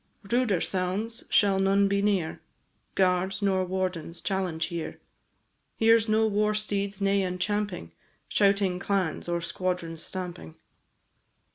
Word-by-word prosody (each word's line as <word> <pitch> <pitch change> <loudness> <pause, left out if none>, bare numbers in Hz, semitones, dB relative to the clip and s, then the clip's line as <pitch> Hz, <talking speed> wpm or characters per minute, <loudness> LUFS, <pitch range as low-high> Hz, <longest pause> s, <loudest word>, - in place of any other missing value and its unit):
Ruder 240 -7 +2
sounds 195 +5 -2
shall 195 -2 +4
none 195 +1 +4
be 200 0 +1
near, 195 -6 0 0.5
Guards 190 +1 +1
nor 190 -2 +2
wardens 180 -3 -3
challenge 185 -5 -1
here; 170 -2 -4 0.8
Here 225 +1 +5
's 220 0 -4
no 220 +1 +4
war 210 0 +1
steed's 200 -1 -2
neigh 195 0 +3
and 180 -1 -2
champing, 205 - -2 0.4
Shouting 195 -2 +2
clans, 185 -4 -1
or 170 0 0
squadrons' 170 -1 -3
stamping. 175 - -6
195 Hz, 125 wpm, -27 LUFS, 180-205 Hz, 0.8 s, Here